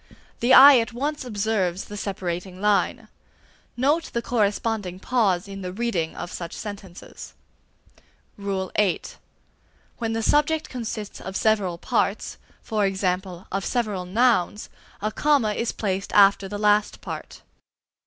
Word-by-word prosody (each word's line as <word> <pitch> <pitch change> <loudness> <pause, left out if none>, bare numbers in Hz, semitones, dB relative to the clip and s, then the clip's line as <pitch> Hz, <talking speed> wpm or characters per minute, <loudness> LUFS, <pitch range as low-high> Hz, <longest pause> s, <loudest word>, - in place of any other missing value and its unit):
The 240 +2 +1
eye 275 -1 +10
at 230 +1 -3
once 290 +4 -2
observes 205 -5 -1
the 205 - -9
separating 185 -2 -4
line. 210 0 +1 0.7
Note 295 +6 +2
the 235 - 0
corresponding 210 -4 -1
pause 200 -6 +1
in 195 0 -8
the 180 -1 -5
reading 190 -6 -2
of 175 - -6
such 170 -1 -6
sentences. 200 -4 -9 1.0
VIII. 195 -1 -1 1.0
When 225 -1 -2
the 225 0 -2
subject 300 +5 +2
consists 220 -4 -6
of 190 0 -5
several 205 -6 +1
parts, - - -1 0.3
e.g., 195 -2 0 0.5
of 195 +1 -2
several 210 -7 -2
nouns, 215 -1 +1 0.3
a 215 - 0
comma 275 -5 +2
is 230 +2 -1
placed 195 -2 -3
after 200 -1 +5
the 205 +1 -5
last 210 0 +2
part. - - -8
210 Hz, 125 wpm, -24 LUFS, 190-235 Hz, 1.0 s, eye